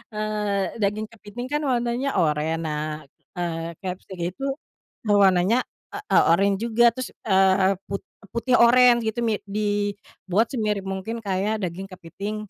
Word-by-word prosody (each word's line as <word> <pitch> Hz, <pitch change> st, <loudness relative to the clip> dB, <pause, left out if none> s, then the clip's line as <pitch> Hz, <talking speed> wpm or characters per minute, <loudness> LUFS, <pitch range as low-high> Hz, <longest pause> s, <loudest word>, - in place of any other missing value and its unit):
eee, 210 Hz, -2 st, -2 dB
daging 210 Hz, +2 st, 0 dB
kepiting 225 Hz, +2 st, -8 dB
kan 295 Hz, -, +1 dB
warnanya 240 Hz, +2 st, 0 dB
oranye, 155 Hz, -1 st, +1 dB
nah, 150 Hz, -1 st, -2 dB, 0.5 s
eee, 170 Hz, -1 st, -3 dB
crabstick 185 Hz, 0 st, -6 dB
itu, 190 Hz, -, -10 dB, 0.6 s
warnanya, 200 Hz, +2 st, +4 dB, 0.3 s
e -, -, -3 dB
eee, -, -, +6 dB
oranye 195 Hz, +3 st, +3 dB
juga 235 Hz, +1 st, +2 dB
terus, 255 Hz, -1 st, -5 dB, 0.2 s
eee, 190 Hz, 0 st, +4 dB
put 195 Hz, 0 st, -4 dB, 0.3 s
putih 245 Hz, +2 st, +1 dB
oranye 240 Hz, 0 st, +7 dB
gitu 220 Hz, +2 st, -2 dB
mi 220 Hz, -3 st, +1 dB
di 205 Hz, 0 st, -1 dB, 0.4 s
buat 215 Hz, +6 st, +3 dB
semirip 210 Hz, -5 st, -1 dB
mungkin 225 Hz, +5 st, -5 dB
kayak 205 Hz, +2 st, -1 dB
daging 185 Hz, +2 st, -4 dB
kepiting, 195 Hz, +3 st, -6 dB
205 Hz, 140 wpm, -24 LUFS, 185-225 Hz, 0.6 s, oranye